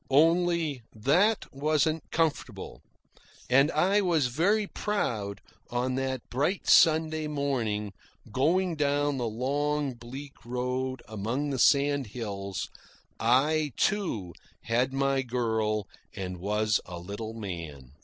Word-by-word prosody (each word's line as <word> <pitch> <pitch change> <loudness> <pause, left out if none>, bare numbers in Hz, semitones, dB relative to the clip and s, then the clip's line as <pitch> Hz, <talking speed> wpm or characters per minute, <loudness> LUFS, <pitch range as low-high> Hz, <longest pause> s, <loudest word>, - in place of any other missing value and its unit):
Only 165 -1 +3
that 180 - +3
wasn't 155 +2 0
comfortable. 160 -2 -2 0.7
And 135 +4 +6
I 190 +7 +3
was 165 -9 +2
very 205 - +2
proud, 115 - -2 0.3
on 125 +1 -1
that 130 -1 -2
bright 145 +10 0
Sunday 155 -1 +5
morning, 120 -9 -1 0.4
going 170 - +2
down 145 -1 +1
the 120 -2 -1
long 140 +4 -1
bleak 130 +4 -10
road 125 +1 -2
among 115 +7 -2
the 135 - -2
sandhills. 115 - +1 0.5
I, 145 +5 +2
too, 115 - 0 0.3
had 125 +3 +1
my 135 0 +1
girl, 110 -4 -1 0.3
and 90 -2 -4
was 105 +3 +1
a 90 - -6
little 105 +5 -6
man. 85 - -7
130 Hz, 110 wpm, -28 LUFS, 110-155 Hz, 0.7 s, And